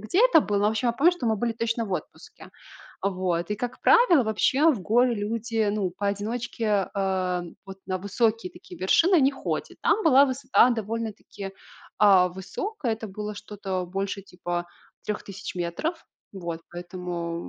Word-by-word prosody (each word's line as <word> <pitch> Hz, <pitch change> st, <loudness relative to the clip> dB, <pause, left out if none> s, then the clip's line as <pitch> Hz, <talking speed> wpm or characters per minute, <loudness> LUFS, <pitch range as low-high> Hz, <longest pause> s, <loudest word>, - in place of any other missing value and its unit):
где 220 Hz, -, 0 dB
это -, -, +6 dB
было, 205 Hz, -5 st, 0 dB
но, 205 Hz, -, +2 dB
в -, -, +1 dB
общем, 220 Hz, +3 st, 0 dB
я 235 Hz, -, +2 dB
помню, 310 Hz, +8 st, +4 dB
что 305 Hz, -10 st, -4 dB
мы 220 Hz, -, +3 dB
были 235 Hz, +2 st, -1 dB
точно 230 Hz, 0 st, -2 dB
в 195 Hz, -, -5 dB
отпуске. -, -, -7 dB, 0.5 s
Вот, 180 Hz, -3 st, -1 dB
и, 210 Hz, -, 0 dB
как 245 Hz, +2 st, -5 dB
правило, 360 Hz, -, +6 dB
вообще 265 Hz, +8 st, +3 dB
в 240 Hz, -, -2 dB
горы 240 Hz, +5 st, +3 dB
люди, 225 Hz, +1 st, -1 dB
ну, 200 Hz, -3 st, -1 dB
поодиночке, 205 Hz, +1 st, -1 dB
э, 185 Hz, -2 st, 0 dB, 0.2 s
вот 195 Hz, 0 st, -9 dB
на 185 Hz, -1 st, -2 dB
высокие 215 Hz, +1 st, 0 dB
такие -, -, -13 dB
вершины 330 Hz, -, +4 dB
не 270 Hz, +1 st, +4 dB
ходят. 270 Hz, -, -4 dB
Там 430 Hz, -1 st, +2 dB
была 280 Hz, -3 st, +7 dB
высота 260 Hz, -1 st, +3 dB
довольно-таки, 220 Hz, -3 st, -4 dB, 0.5 s
э, 190 Hz, -3 st, +6 dB
высокая. 225 Hz, -, -4 dB
Это 220 Hz, 0 st, -5 dB
было 210 Hz, +2 st, -5 dB
что-то 195 Hz, -3 st, -4 dB
больше 195 Hz, +2 st, -3 dB
типа 175 Hz, -2 st, -4 dB, 0.4 s
3000 195 Hz, -3 st, -5 dB
метров. 180 Hz, -, -3 dB, 0.3 s
Вот, 170 Hz, -4 st, -5 dB
поэтому 175 Hz, -1 st, -5 dB
210 Hz, 160 wpm, -26 LUFS, 185-235 Hz, 0.5 s, была